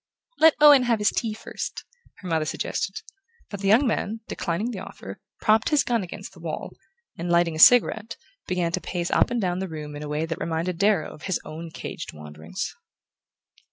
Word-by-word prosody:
"Let 320 0 +7
Owen 295 -3 +8
have 235 -2 +2
his 210 -1 +2
tea 220 -2 -2
first," - - -6 0.4
her 185 - -7
mother 160 -2 +1
suggested; 190 +4 -3 0.5
but 200 - -5
the 195 - -2
young 225 +8 +5
man, 225 -1 -1
declining 195 +8 -2
the 205 - -5
offer, 95 - -9 0.2
propped 220 +1 +3
his 300 -2 +3
gun 235 -2 0
against 180 - -8
the - - -15
wall, - - -5 0.5
and, 170 +1 -3
lighting 170 -1 +3
a - - -5
cigarette, 225 +1 +5 0.3
began 180 -2 0
to 185 - -2
pace 175 +1 -3
up - - +3
and 240 -1 -1
down 180 -3 -1
the 190 -1 -4
room 150 -2 -7
in 145 - -7
a 150 - -6
way 150 +2 -1
that 165 0 -5
reminded 165 +2 -2
Darrow 200 -6 +2
of - - -14
his 190 - 0
own 165 +2 -7
caged - - -7
wanderings. 75 - -6
185 Hz, 195 wpm, -25 LUFS, 165-220 Hz, 0.5 s, Owen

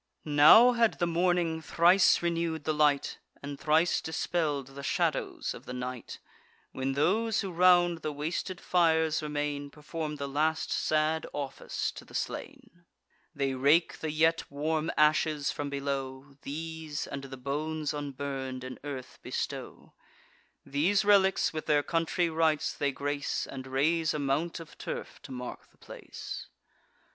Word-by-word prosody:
Now 155 +12 +8
had 235 -2 +2
the 175 - +1
morning 170 -1 +1
thrice 175 +3 +4
renew'd 165 -2 -1
the 155 - 0
light, 150 -2 +2 0.2
And 140 0 -6
thrice 160 +3 +2
dispell'd 155 -4 -1
the 140 +1 -9
shadows 140 - -1
of - - -11
the 125 - -5
night, 125 -1 -6 0.5
When 135 +1 -2
those 215 +10 +1
who 195 -3 -4
round 175 -1 +4
the 155 - -3
wasted 160 +5 -3
fires 160 -4 +2
remain, 145 -1 -3
Perform 150 +1 -5
the 140 -1 -4
last 155 +3 0
sad 155 +1 +1
office 140 -2 -3
to - - -11
the - - -14
slain. 180 +1 -6 0.5
They 140 -1 0
rake 145 +6 +3
the 160 - -3
yet 160 +2 +2
warm 155 +3 -1
ashes 150 -1 +3
from 145 -1 -4
below; 140 -1 -4
These, 160 0 -5
and 140 0 -6
the 135 -1 -8
bones 150 +3 -2
unburn'd, 135 -3 -4
in 130 0 -7
earth 135 -3 -7
bestow; - - -5 0.7
These 185 +9 +2
relics 195 -4 +4
with 155 - -5
their 145 -1 +3
country 165 +2 0
rites 160 -2 +1
they 140 -1 0
grace, 140 +2 -2
And 130 -1 -8
raise 155 +5 +1
a - - -2
mount 145 +5 -1
of 165 -2 -12
turf - - -6
to - - -11
mark 125 -1 -7
the - - -30
place. - - -8
155 Hz, 145 wpm, -29 LUFS, 140-165 Hz, 0.7 s, Now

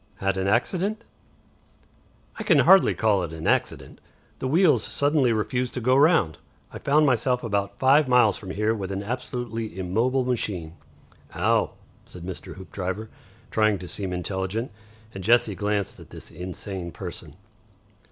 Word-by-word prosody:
"Had 95 0 -1
an 95 0 -1
accident?" 185 - 0 1.3
"I - - -5
can - - +4
hardly 190 0 +6
call 105 -3 +2
it 85 -2 -5
an 80 0 -7
accident. - - -1 0.4
The - - -2
wheels 165 +4 +4
suddenly 145 -3 +1
refused 125 +3 -1
to - - -1
go 130 +2 +2
round. 140 - +3 0.3
I - - -7
found 150 +2 +3
myself 125 -1 +1
about 100 -3 -2
five 135 +2 +4
miles 125 -5 +4
from 95 - -8
here 105 +3 0
with 100 -3 -4
an 100 +1 -3
absolutely 120 -2 -4
immobile 115 +8 0
machine." 100 -10 -2 0.6
"Ow!" - - +1 0.3
said 90 - -11
Mr. 95 -1 -7
Hoopdriver, 95 +3 -5 0.4
trying 110 -2 +2
to 90 -1 -9
seem 95 +1 -4
intelligent, 95 +6 -3 0.4
and 95 - -7
Jessie 115 0 +4
glanced 100 0 -2
at - - -14
this - - -10
insane 90 +1 -6
person. 85 -4 -8
105 Hz, 150 wpm, -25 LUFS, 95-125 Hz, 1.3 s, hardly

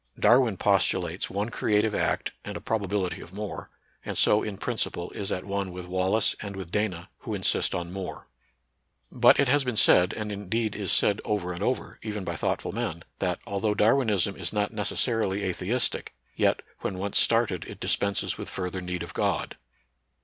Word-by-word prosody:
Darwin 120 -5 +5
postu 100 0 +3
lates - - -3
one 100 +3 -2
creative 105 -1 +1
act - - 0
and - - -5
a - - -6
probability 100 -3 -1
of 90 - -11
more, 105 0 -5 0.3
and - - -4
so 105 - +4
in 105 -2 -4
principle 105 -6 -2
is 100 -2 -4
at 90 - -2
one 100 -1 -2
with 90 0 -7
Wallace 95 +4 +2
and 100 -1 -6
with 95 -3 -7
Dana, 95 -5 -1
who - - -4
insist - - +1
on 85 0 -4
mtare. 95 -4 -5 0.9
But - - +5
it 140 - +4
has 145 +2 +4
been 125 -4 -2
said, 90 -3 +6
and 105 -1 -4
indeed 105 +2 -2
is 100 -3 -2
said 100 0 +3
over 95 -4 -1
and 85 - -7
over, 125 +1 -2
even 105 -2 -4
by 85 -2 -3
thoughtful - - -1
men, 85 +1 -3 0.2
that, 90 -2 -1
al 100 0 -2
though 105 0 +1
Darwinism 105 -4 +3
is - - -1
not 105 +1 -1
necessarily 105 -1 0
atheistic, 95 +6 -1 0.2
yet, - - +2 0.2
when 95 - -3
once 100 +2 +1
started 115 -7 +3
it - - -9
dispenses 100 0 0
with - - -5
further 95 0 -3
need 90 -1 -3
of 85 -1 -8
God. - - -1
100 Hz, 185 wpm, -27 LUFS, 90-110 Hz, 0.9 s, said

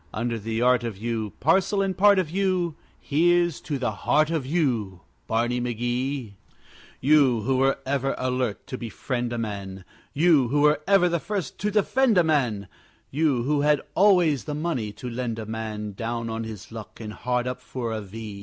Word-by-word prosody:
Under 115 +1 -2
the 110 +2 -2
art 125 -1 +4
of 115 -4 -4
you, 110 -1 -3
Parcel 190 +6 +2
and 190 -1 -1
part 200 +1 +5
of 180 -5 0
you, 185 -3 0 0.3
Here's 175 +2 +2
to 145 - -3
the 130 - -1
heart 155 +2 +1
of 155 -6 -2
you, 120 - -1 0.3
Barney 120 +2 0
McGee! 120 0 -2 0.7
You 135 -5 +4
who 130 +4 0
were 135 +1 +2
ever 135 0 0
alert 125 -5 -2
to 130 - -6
befriend 120 +1 -3
a 120 - -3
man, 100 -4 -5 0.3
You 150 -3 +4
who 145 +4 +1
were 150 0 +4
ever 195 -2 +5
the 170 -1 0
first 200 0 -4
to 210 - 0
defend 220 +2 +2
a 175 - +6
man, 125 - 0 0.4
You 140 -4 +1
who 145 +2 +1
had 150 0 +3
always 180 - +4
the 150 - -3
money 150 -9 -2
to 115 +4 -8
lend 120 -1 -3
a 110 - -5
man, 110 -1 -5
Down 115 +2 -3
on 115 0 -3
his 110 -2 -9
luck 110 -2 -9
and 110 -2 -6
hard 125 +1 -1
up 125 0 -4
for 125 -2 -5
a 110 - -3
V! 105 0 -8
125 Hz, 185 wpm, -25 LUFS, 115-155 Hz, 0.7 s, a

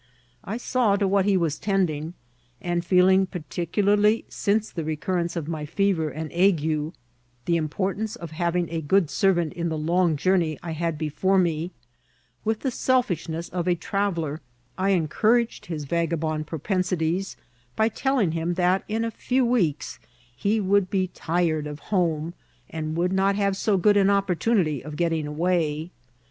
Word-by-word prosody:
I 210 +4 -4
saw 245 -4 +1
to 200 -1 +1
what 195 0 +2
he 200 -2 +3
was 160 -4 -1
tending; 175 -5 -1 0.4
and 175 -1 -1
feel 180 +1 +4
ing, 190 0 +4
particularly 200 +6 +1
since 215 +1 0
the 165 - -4
recurrence 170 +3 -2
of 165 -4 -3
my 155 -2 -4
fever 175 -2 +1
and 155 0 -6
ague, 160 -4 +1 0.5
the 170 - +2
importance 190 +7 -2
of 170 -2 -8
having 170 +1 0
a 165 -1 -2
good 165 +1 +2
servant 175 -5 +2
in 170 -1 -2
the 160 - -2
long 170 +1 +2
journey 170 -2 +1
I 170 - -4
had 165 0 -2
before 160 +6 +1
me, 170 -2 +1 0.7
with 220 0 -1
the 265 - -1
selfishness 175 - 0
of 175 0 -3
a 180 - +3
traveller 170 -4 -2 0.3
I 190 +1 0
encouraged 215 +7 +1
his 160 -4 -4
vagabond 160 -1 -1
propensities, 180 +1 -1 0.4
by 220 - +3
tell* 270 +5 0
ing 195 -9 +2
him 165 +2 -1
that 180 +1 +2
in 225 +2 -1
a 230 - -2
few 255 +3 0
weeks 185 - 0 0.4
he 205 - +1
would 200 -1 +2
be 185 -2 0
tired 165 -3 -1
of 150 -1 -6 0.2
home, 165 -3 +1 0.4
and 155 -1 -3
would 180 +2 +1
not 195 +1 +2
have 200 -1 +1
so 200 0 +1
good 205 +3 +4
an 195 -1 +4
opportunity 195 - +1
of 150 +1 -7
getting 165 -2 0
away. 160 0 -1
175 Hz, 160 wpm, -25 LUFS, 160-195 Hz, 0.7 s, feel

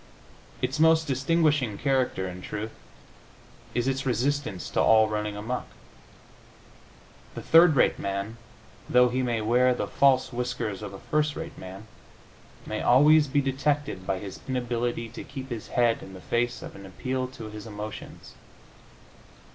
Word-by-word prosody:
Its - - -1
most 160 0 +5
distinguishing 145 -4 +1
character, 130 -9 0
in 90 0 -7
truth, 105 +4 -5 1.0
is 120 +1 0
its 135 0 0
resistance 130 -4 -1
to - - +2
all 110 -1 +5
running 105 -1 -3
amuck. 115 +5 -4 1.7
The - - -6
third 165 -1 +6
rate 125 - +3
man, 100 +3 -3 0.5
though 125 0 +5
he 130 +2 -1
may 120 -3 0
wear 125 +3 +3
the - - -2
false 135 -2 +3
whiskers 120 -5 -3
of 105 -2 -6
a - - -13
first 150 -1 +2
rate 165 0 -6
man, 95 +3 -9 0.8
may - - -3
always 150 +4 +6
be 140 +2 +2
detected 135 -6 -1
by 95 - 0
his 95 -1 -8
inability 120 -2 -2
to 120 - -8
keep 135 -1 -8
his 115 -3 -5
head 120 -2 +2
in 95 - -10
the 95 - -9
face 120 +4 -1
of - - -9
an 100 -1 -10
appeal 130 +7 -3
to 115 -4 -9
his 105 0 -8
emotions. 105 0 -8
125 Hz, 150 wpm, -27 LUFS, 105-135 Hz, 1.7 s, third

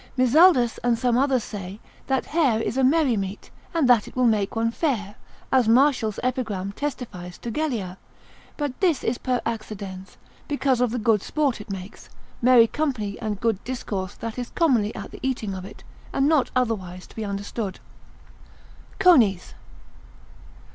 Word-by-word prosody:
Mizaldus 255 -1 +5
and 240 -1 +2
some 245 0 +1
others 260 -2 +2
say, 195 -1 -7 0.3
that 265 -1 0
hare 285 -9 +2
is 225 - -2
a 265 - +2
merry 275 -2 +3
meat, 195 0 -5 0.2
and 330 -6 +2
that 240 -4 +4
it - - -12
will 255 -1 +2
make 215 -3 +1
one 230 0 +1
fair, 230 - -1 0.4
as 255 -4 +4
Martial's 245 -3 +3
epigram 225 -7 -2
testifies 205 -9 -6
to 235 - -6
Gellia; 225 -10 -3 0.6
but 290 -4 -3
this 345 -7 +2
is 230 +2 -1
per 250 -2 0
accidens, 200 -4 -6 0.3
because 275 -4 +1
of 250 - +3
the 245 - -3
good 220 -3 +2
sport 280 -5 -1
it 210 - -13
makes, 190 0 -8 0.3
merry 245 -1 +7
company 230 -7 -2
and 210 -2 -3
good 225 -3 0
discourse 205 -6 -4
that 230 +1 -6
is 245 - -4
commonly 250 -11 +2
at - - -7
the - - -10
eating 245 -7 -2
of 185 -1 -6
it, 200 - -12 0.3
and 275 - +2
not 300 -4 +3
otherwise 190 -8 -1
to - - -18
be 220 - -4
understood. 200 0 -4 1.2
_Conies. 240 - +4
230 Hz, 160 wpm, -24 LUFS, 205-260 Hz, 1.2 s, merry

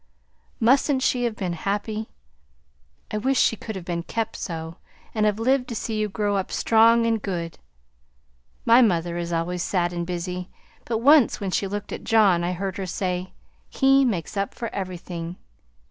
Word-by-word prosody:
Mustn't 260 +3 +3
she 245 -1 +1
have 230 -2 -1
been 185 -4 -3
happy! 210 +5 -3 1.0
I 215 - -1
wish 265 +4 +1
she - - +3
could 220 0 -7
have 185 -3 -7
been 170 -1 -2
kept 225 +5 -3
so, 165 -2 -5 0.4
and 215 -1 +2
had 210 0 0
lived 255 +2 +2
to 235 - -5
see 220 0 -3
you 215 0 0
grow 205 0 0
up 190 - -3
strong 230 +1 +4
and 225 -2 +1
good. 170 -4 -4 1.1
My 235 +2 +7
mother 175 -6 +1
is 170 0 -4
always 170 +2 -1
sad 175 -1 0
and 170 -1 -3
busy, 180 +1 -4 0.4
but 230 - -1
once 285 -2 +6
when 195 -2 -3
she 195 - 0
looked 205 +1 -5
at - - -6
John 205 -6 +4
I 175 +1 -1
heard 190 +1 -4
her 190 -1 -4
say, 180 0 -3 0.4
'He 270 0 +4
makes 205 -10 -1
up 200 0 -2
for 230 -2 -5
everything.' 175 -2 -5
200 Hz, 175 wpm, -24 LUFS, 175-225 Hz, 1.1 s, My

